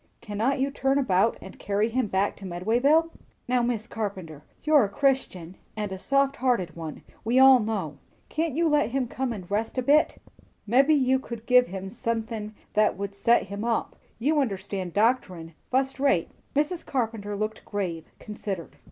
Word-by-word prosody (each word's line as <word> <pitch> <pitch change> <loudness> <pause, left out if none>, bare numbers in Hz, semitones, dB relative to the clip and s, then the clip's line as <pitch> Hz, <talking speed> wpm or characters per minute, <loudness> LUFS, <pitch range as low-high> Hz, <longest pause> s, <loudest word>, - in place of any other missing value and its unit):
"Cannot 225 +6 -1
you 275 +1 0
turn 270 0 +1
about 215 -5 +2
and 190 - -11
carry 205 +2 0
him 240 0 0
back 195 +1 0
to - - -13
Medwayville?" 240 - +2 0.4
"Now, 250 0 +2
Mis' 235 -2 -1
Carpenter, 190 -10 -5 0.2
you're 305 -2 +5
a 200 - -1
Christian, 200 -8 -1 0.2
and 210 -2 -3
a 190 - -5
soft 275 +4 +1
hearted 235 -10 0
one, 160 -2 -7 0.2
we 235 +3 +1
all 265 -1 +8
know. 200 -10 -3 0.3
Can't 315 -3 -2
you 335 +1 +2
let 295 -3 +2
him 255 0 -1
come 260 +1 -3
in 205 -5 -5
and 175 - -18
rest 220 +5 -1
a 255 - +1
bit? 295 +4 +3 0.5
Mebbe 260 +7 +4
you 265 -3 +4
could 235 -3 -8
give 250 0 +5
him 190 +1 -6
sunthin' 225 -2 -3 0.2
that 210 -3 +3
would 200 0 -4
set 235 +4 +3
him 200 +2 -6
up. 235 -1 -1 0.2
You 295 +6 +1
understand 190 -6 -4
doctorin', 205 -7 +1 0.2
fust 265 +1 0
rate." 270 -12 +2 0.2
Mrs. 305 +4 0
Carpenter 225 -5 -2
looked 215 +2 -3
grave, 180 -6 -4
considered. 200 -5 -6
225 Hz, 175 wpm, -26 LUFS, 200-265 Hz, 0.5 s, all